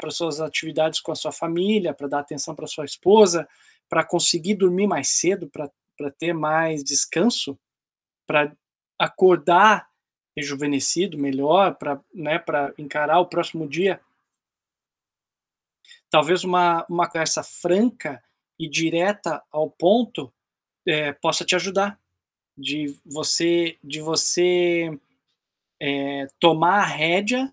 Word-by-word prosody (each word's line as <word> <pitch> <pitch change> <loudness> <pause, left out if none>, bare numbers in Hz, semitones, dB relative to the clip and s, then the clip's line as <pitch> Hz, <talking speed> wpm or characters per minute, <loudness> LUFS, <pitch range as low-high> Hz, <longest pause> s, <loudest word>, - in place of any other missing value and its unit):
linkar - - -9
as 155 - -4
suas 160 -3 -3
atividades 160 +1 -1
com 165 - -7
a - - -5
sua 155 0 -4
família, 175 +1 -1
pra 140 0 -9
dar 145 +1 -2
atenção 145 +2 -7
pra 155 - -11
sua 155 0 -7
esposa, 180 0 +5 0.4
pra 165 -1 +2
conseguir 170 +3 +2
dormir 190 0 +2
mais 145 -8 0
cedo, 180 -3 +2
pra 150 -1 -10 0.3
pra 145 -1 -7
ter 165 +5 -4
mais 155 -1 -1
descanso, 145 - +1 0.7
pra 150 -1 +1 0.4
acordar 185 +2 +5 0.5
rejuvenescido, 145 +4 -1
melhor 145 +7 +2
pra 140 -2 -6
né, 155 0 -2
pra 150 -4 -3
encarar 150 +2 0
o 180 - +3
próximo 165 -2 -4
dia. 175 +6 -1 2.1
Talvez 170 +4 +3
uma 175 -2 +2
uma 175 -1 0
conversa 160 -2 -1
franca 180 - -1 0.4
e 160 -1 -7
direta 165 +3 -1
ao 155 0 -3
ponto, 190 - 0 0.6
eh, 150 -2 0
possa 160 +2 -1
te 180 - +3
ajudar, 195 +2 -2 0.6
de 140 +1 -5
você 170 +3 0
de 150 +1 -8
você, 170 +1 +2 1.2
eh, 140 -1 -6
tomar 170 +4 +4
a 200 - +4
rédea 205 - 0
165 Hz, 120 wpm, -21 LUFS, 150-180 Hz, 2.1 s, esposa